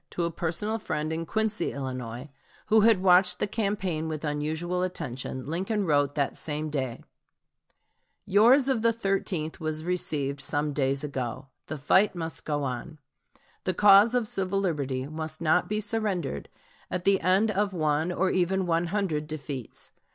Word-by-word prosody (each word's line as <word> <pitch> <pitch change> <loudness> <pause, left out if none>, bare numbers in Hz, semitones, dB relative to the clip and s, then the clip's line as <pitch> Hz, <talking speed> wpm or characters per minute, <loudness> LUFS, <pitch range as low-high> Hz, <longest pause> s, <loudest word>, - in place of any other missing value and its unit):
To 175 - -3
a 170 - 0
personal 175 +7 -2
friend 155 -6 -3
in 165 0 -4
Quincy, 220 -4 0
Illinois, 130 -1 -5 0.4
who 220 0 +6
had 215 -3 +4
watched 180 0 +5
the - - 0
campaign 195 -6 -2
with 155 -1 -4
unusual 160 +4 -2
attention, 135 -7 -4
Lincoln 190 +6 -1
wrote 145 -3 +2
that 140 -2 0
same 150 0 -4
day: 130 -5 -3 1.2
"Yours 240 +7 +5
of 260 -5 +1
the 230 0 +3
13th 195 -7 -1
was 155 -1 -3
received 145 -6 -1
some 145 +2 -1
days 135 0 0
ago. 130 -1 -4 0.2
The 155 - -4
fight 190 +8 +3
must 165 -1 -5
go 145 -1 -1
on. 135 +5 -4 0.7
The 185 - -1
cause 205 +4 +7
of 240 -3 +1
civil 195 -1 -1
liberty 140 -8 -1
must 155 +1 -6
not 165 +2 +2
be 210 0 0
surrendered 205 - -2 0.4
at 180 -1 -3
the 195 +1 +3
end 195 +4 +3
of 205 0 0
one 155 -1 0
or 185 +1 +1
even 185 +1 +1
one 170 0 +1
hundred 165 -6 -1
defeats. 140 -5 -6
165 Hz, 160 wpm, -27 LUFS, 150-195 Hz, 1.2 s, cause